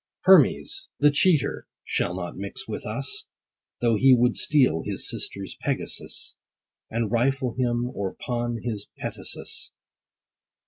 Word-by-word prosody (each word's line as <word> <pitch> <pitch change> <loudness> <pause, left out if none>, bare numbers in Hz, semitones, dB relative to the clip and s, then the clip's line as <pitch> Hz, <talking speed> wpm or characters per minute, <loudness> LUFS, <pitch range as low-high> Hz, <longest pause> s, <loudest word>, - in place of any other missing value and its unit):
Hermes, 385 -1 +4
the 145 0 +6
cheater, 155 - +2 0.2
shall 90 - -1
not 90 -1 -5
mix 100 +1 -6
with - - -5
us, 420 +1 -2 0.5
Though 115 -2 +3
he 130 +3 +7
would 120 0 +3
steal 130 - +3
his - - -3
sisters' 100 -1 -3
Pegasus, - - -1 0.5
And 115 -2 -1
rifle 130 +1 +1
him: 120 -1 0
or 100 -4 -3
pawn 120 -1 -3
his 110 -4 -3
petasus. - - -4
120 Hz, 125 wpm, -25 LUFS, 105-135 Hz, 0.5 s, he